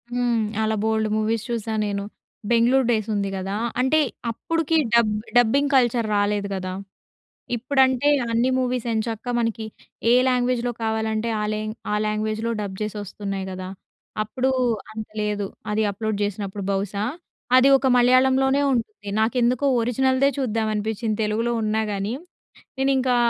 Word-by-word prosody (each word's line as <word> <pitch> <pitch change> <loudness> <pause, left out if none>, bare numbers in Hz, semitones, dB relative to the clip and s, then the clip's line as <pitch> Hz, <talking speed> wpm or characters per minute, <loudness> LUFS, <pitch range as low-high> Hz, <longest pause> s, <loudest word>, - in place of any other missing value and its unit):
హ్మ్. 240 -2 +1 0.2
అలా 220 0 +1
బోల్డు 220 0 +1
మూవీస్ 220 0 0
చూసా 225 -1 -2
నేను. 200 -1 -2 0.5
'బెంగుళూరు 240 +2 +4
డేస్' 220 -2 0
ఉంది 200 -1 -1
గదా! 195 +2 -3 0.3
అంటే 290 +5 +3 0.3
అప్పుడికి 325 +6 0 0.2
డబ్ 230 -3 +4 0.2
డబ్బింగ్ 275 +5 +3
కల్చర్ 240 -3 +3
రాలేదు 205 0 +1
గదా! 185 0 -4 0.8
ఇప్పుడంటే 260 +2 +2 0.2
అన్ని 235 +3 +2
మూవీస్ 250 -2 -1
ఎంచక్కా 225 +2 -2
మనకి 230 -1 -1 0.5
ఏ - - +6
లాంగ్వేజ్‍లో 245 -1 +1
కావాలంటే, 220 0 -1
ఆ - - -1
లాంగ్ 215 +1 -4 0.2
ఆ - - +2
లాంగ్వేజ్‍లో 215 +2 -1
డబ్ 190 -2 -5
జేసి 210 0 -3
ఒస్తున్నాయి 195 -1 -5
గదా! 185 0 -6 0.5
అప్పుడు 255 +5 -1 0.4
అంత 220 0 -6 0.2
లేదు. 205 -1 -1 0.2
అది 215 +1 +1
అప్లోడ్ 215 +1 -3
జేసినప్పుడు 200 0 -4
బహుశా. 200 +1 -2 0.5
అది 260 +2 +6
ఒక 265 0 0
మలయాళంలోనే 265 +2 +4
ఉంటుంది. 215 -3 -3
నాకెందుకో 240 +3 +1 0.2
ఒరిజినల్దే 260 +3 +2
చూద్దాం 225 -4 0
అనిపించింది 215 +1 -2
తెలుగులో 225 +3 0
ఉన్నా 215 +1 +1
గాని, 200 +2 -2 0.7
నేనింకా 265 -2 +2
225 Hz, 135 wpm, -23 LUFS, 210-250 Hz, 0.8 s, ఏ